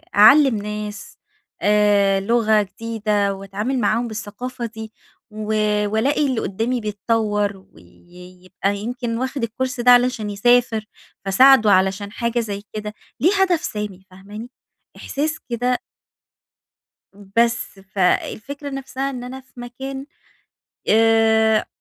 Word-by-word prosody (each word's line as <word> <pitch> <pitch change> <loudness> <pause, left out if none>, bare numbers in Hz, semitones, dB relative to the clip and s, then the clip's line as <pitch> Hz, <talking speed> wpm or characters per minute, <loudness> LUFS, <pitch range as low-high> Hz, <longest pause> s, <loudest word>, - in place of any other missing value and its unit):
أعلِّم 265 +5 +7
ناس 210 0 -6 0.4
آآ، 205 -1 +3
لغة 220 0 +3
جديدة 210 -1 -1
وأتعامل 200 +7 -3
معاهم 235 0 +1
بالثقافة 235 +3 -6
دي، 220 -1 -8 0.4
و 215 0 -4 0.3
وألاقي 270 +8 +1
اللي 255 -4 -1
قدّامي 225 +5 -2
بيتطور، 210 -2 -1
ويبقى 180 - -7
يمكن 235 +2 -4
واخد 260 0 -2
الCourse 255 +3 -3
ده 250 - +6
علشان 245 -3 +3
يسافر، 225 +1 +2 0.4
فاساعدُه 220 +2 +6
علشان 195 +2 +2
حاجة 235 +2 -1
زي 205 -3 -4
كده، 210 0 -5 0.3
ليه 350 +6 +4
هدف 360 -4 +2
سامي 205 - -5
فاهماني، 205 +5 -10 0.5
إحساس 305 +3 -3
كده 245 +1 0 1.4
بس 215 +3 -1
فالفكرة 215 +9 -2
نفسها 270 0 -4
إن 250 -2 -6
أنا 260 +2 -7
في 260 -1 -15
مكان 265 +3 -7 0.8
آآ، 220 0 +4
220 Hz, 110 wpm, -21 LUFS, 205-245 Hz, 1.4 s, أعلِّم